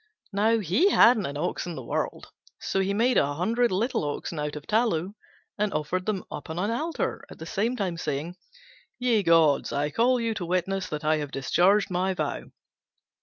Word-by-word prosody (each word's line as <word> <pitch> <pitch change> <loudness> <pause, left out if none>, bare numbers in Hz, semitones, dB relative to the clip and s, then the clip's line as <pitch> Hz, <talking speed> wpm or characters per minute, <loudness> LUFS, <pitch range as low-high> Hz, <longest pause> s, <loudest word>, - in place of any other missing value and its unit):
Now, 220 +3 +3
he 215 - +2
hadn't 230 - +5
an 140 +1 -5
ox 150 - -2
in 175 - -5
the 130 - -7
world, - - -3 0.3
so 195 - -1
he 190 +1 +1
made 235 +5 +3
a 145 +1 0
hundred 230 +8 +1
little 215 - 0
oxen 150 +2 -4
out 150 0 -3
of 150 - -8
tallow 205 -5 0 0.5
and 210 -1 +1
offered 165 +6 -2
them 205 -3 -1
up 150 - -7
on 160 - -5
an 200 +5 0
altar, 315 +8 -2
at - - -11
the 160 - -8
same 220 +8 -1
time 190 -7 -2
saying, 155 +3 -3 0.6
"Ye 240 -4 +2
gods, 165 -5 +3
I 145 +1 -1
call 245 - +2
you 230 -1 -1
to 195 -5 -4
witness 185 +2 -1
that 150 0 -5
I 155 0 +3
have 145 -2 -4
discharged 185 +10 +2
my 185 +1 0
vow." - - -3
185 Hz, 195 wpm, -26 LUFS, 155-220 Hz, 0.6 s, hadn't